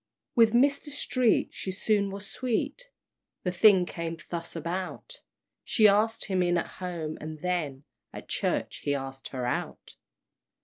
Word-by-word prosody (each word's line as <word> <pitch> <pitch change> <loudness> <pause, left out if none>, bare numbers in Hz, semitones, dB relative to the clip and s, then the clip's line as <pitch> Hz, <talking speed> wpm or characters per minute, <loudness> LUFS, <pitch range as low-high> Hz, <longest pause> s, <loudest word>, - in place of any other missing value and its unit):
With 230 -3 +5
Mr. 280 +4 +3
Street 255 -4 +1
she 190 - -4
soon 200 +1 +1
was 200 +1 -6
sweet; 255 - -2 0.5
The 180 - 0
thing 185 0 +6
came 165 -1 -4
thus 170 -1 -5
about: 170 +3 -4 0.4
She 215 -4 +5
asked 220 +3 +3
him 190 -2 +1
in 175 0 +2
at 170 - 0 0.2
home, 170 -4 -4
and 155 0 -6
then 155 -7 -1 0.3
At - - -9
church, - - -1
he 145 - -1
asked 135 -1 -5
her 125 -2 -4
out! 125 - -3
185 Hz, 145 wpm, -28 LUFS, 165-220 Hz, 0.5 s, thing